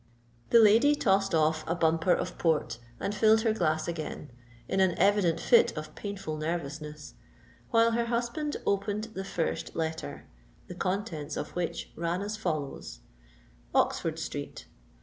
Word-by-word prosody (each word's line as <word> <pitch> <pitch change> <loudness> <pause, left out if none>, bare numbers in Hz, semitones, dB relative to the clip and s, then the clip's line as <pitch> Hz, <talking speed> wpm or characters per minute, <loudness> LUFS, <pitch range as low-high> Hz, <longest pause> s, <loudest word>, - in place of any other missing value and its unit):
The - - +6
lady 225 +7 +6
tossed 195 - +2
off 155 0 +2
a 165 - 0
bumper 165 +1 +2
of - - -4
Port, 155 -8 +1 0.2
and 200 - -2
filled 220 +1 +4
her 220 -1 +2
glass 160 -6 0
again, 155 -4 -5 0.4
in 190 - 0
an 190 -2 +3
evident 195 -3 +3
fit 475 0 +4
of - - -6
painful 195 -7 -5
nervousness; 150 -1 -5 0.6
while 230 -1 +4
her 235 +1 +1
husband 240 +6 -2
opened 205 +2 -1
the 190 - -4
first 165 -3 -3
letter, 160 - -4 0.4
the - - -8
contents 180 -5 -3
of - - -5
which 175 -2 -3
ran 170 +3 -2
as 210 +1 -3
follow:— 155 -9 -3 0.9
_Oxford - - +1
Street. - - -6
180 Hz, 145 wpm, -29 LUFS, 160-215 Hz, 0.9 s, The